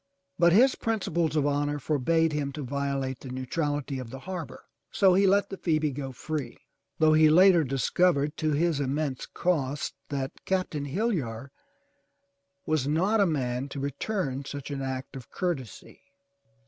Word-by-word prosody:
But 170 0 +6
his 250 +9 +6
principles 170 -8 -1
of 150 -2 +2
honor 145 0 0
forbade 155 +3 +1
him 145 -2 -1
to 150 - -5
violate 135 -1 -2
the 135 - -9
neutral 145 +4 -2
ity 140 -2 -5
of 125 -3 -7
the 135 +2 -8
harbor, 180 -2 -7 0.3
so 190 -2 +4
he 195 +2 +4
let 200 +1 +3
the 195 - -5
Phoebe 155 -4 +1
go 135 0 -5
free, 140 -1 -5 0.4
though 155 -1 +4
he 155 0 +6
later 175 +1 +6
dis 135 -1 -1
covered 150 -4 +2
to 155 -1 0
his 160 0 +1
immense 140 -1 -2
cost 150 -5 -1 0.2
that 135 -1 -4
Captain 185 -6 -1
Hillyar 140 - -2 1.1
was 155 -4 0
not 185 +9 +2
a 200 - +4
man 130 -3 -2
to 140 - -6
return 140 0 -2
such 140 0 -7
an 140 -1 -3
act 130 0 -5
of 130 -3 -9
courtesy. 135 - -4
145 Hz, 160 wpm, -27 LUFS, 135-170 Hz, 1.1 s, But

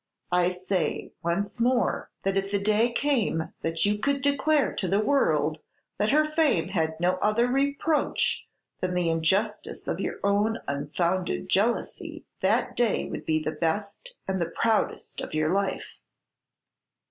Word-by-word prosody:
I 180 0 +3
say 180 -3 -2
once 195 +6 -2
more, 245 +1 +1
that 195 0 0
if 195 0 0
the 200 - +1
day 215 +4 +2
came 235 - 0
that 165 +2 0
you 205 0 +1
could 280 +3 0
declare 285 +1 +2
to 190 - -1
the 195 +3 +2
world 160 - +2 0.4
that 210 - +2
her 305 +3 +4
fame 305 - +1
had 160 -4 -1
no 180 +2 +2
other 215 +5 +2
reproach 280 +4 0 0.3
than 180 -1 -2
the 175 -2 +1
injustice 190 +7 -1
of - - -2
your - - -3
own 205 +3 +2
unfounded 170 +6 -1
jealousy, 220 +5 -1
that - - +1
day 235 -4 +1
would - - -6
be 155 -1 +1
the 155 - -1
best 200 - -3
and 190 -1 -1
the 170 - -1
proudest 225 +4 -1
of - - -6
your 155 +2 +1
life." 200 0 -2
200 Hz, 150 wpm, -27 LUFS, 170-240 Hz, 0.4 s, her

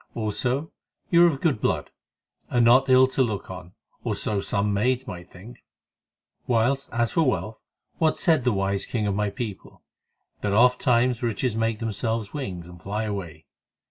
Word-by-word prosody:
Also, 125 +7 -2 0.4
you 170 0 +6
are 175 - +7
of 140 -4 -4
good 140 -10 +1
blood, - - -1 0.6
and 120 -1 +3
not 130 +3 +5
ill 130 0 +7
to 130 +1 -1
look 110 -7 -2
on, 90 -1 -10 0.3
or - - -1
so 105 -2 -1
some 100 +1 0
maids 125 +5 +1
might 90 -7 -8
think; 110 +7 -14 0.8
whilst 125 +3 +1
as 120 0 0
for 165 - +2
wealth, 115 -6 -1 0.4
what 160 -1 +2
said 160 -7 +3
the 125 - +2
wise 100 -1 0
king 110 -3 -2
of 100 - 0
my 105 +1 0
people?—that 100 -1 -8
ofttimes 125 +1 +3
riches 115 0 -1
make 115 0 0
themselves 110 0 -3
wings 95 - -5
and 90 -1 -13
fly 105 +5 -3
away. 90 -7 -5
115 Hz, 165 wpm, -25 LUFS, 100-130 Hz, 0.8 s, are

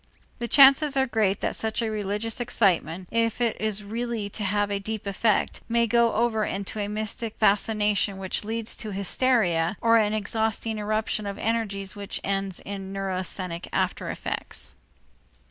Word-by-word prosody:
The 240 - -2
chances 275 +2 +6
are 265 - +4
great 215 -5 +1
that - - 0
such 220 0 -1
a 220 - -1
religious 210 +2 -2
excitement, 185 -7 +1
if 230 0 +1
it 235 -2 +1
is 215 -1 -1
really 225 0 -3
to 210 - -5
have 205 +1 0
a 200 - 0
deep 215 +1 -5
effect, 200 +2 +1
may 235 0 +3
go 235 0 +3
over 225 -1 +1
into 200 +1 -3
a 205 - -1
mystic 215 +1 -2
fascination 210 -1 +2
which 190 +1 -3
leads 225 +1 -3
to 215 -3 -6
hysteria 195 -4 +1
or 230 0 +5
into 215 - +3
an 210 - -2
exhausting 220 +1 -1
eruption 215 0 -1
of 200 - -4
energies 210 -4 -2
which 200 -1 -4
ends 195 -1 -1
in 195 -1 -6
neurasthenic 185 -2 -4
after - - -1
effects. - - -3
210 Hz, 165 wpm, -26 LUFS, 195-230 Hz, -, chances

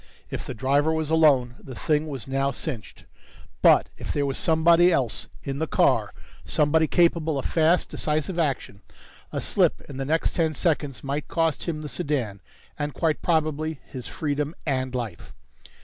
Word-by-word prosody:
If - - -5
the - - -5
driver 140 +6 +2
was 160 -1 -1
alone, 140 -7 +4
the 130 - -9
thing 155 +3 0
was 135 -5 -6
now 135 +1 +1
cinched! 125 - -6 0.6
But - - +6
if - - -4
there 145 -1 0
was 135 -1 -2
somebody 170 +2 +5
else 130 -9 0 0.2
in 140 0 -4
the 160 - -1
car, - - +2 0.3
somebody 155 +1 +2
capable 165 -3 +2
of 135 - -3
fast, 165 +2 +2
decisive 155 +4 -2
action, 135 -10 -2 0.5
a - - -2
slip - - +2
in 140 - -10
the 135 - -3
next 160 +4 0
ten 160 -3 0
seconds 145 -5 -1
might 140 +2 -3
cost 165 -2 0
him 155 -3 -3
the - - -4
sedan, 125 -7 -2 0.4
and 145 -2 -3
quite 160 0 0
probably 155 -2 0
his 130 -3 -7
freedom 150 -2 -2
and 130 -3 -1
life. 115 - -5
150 Hz, 165 wpm, -25 LUFS, 135-160 Hz, 0.6 s, But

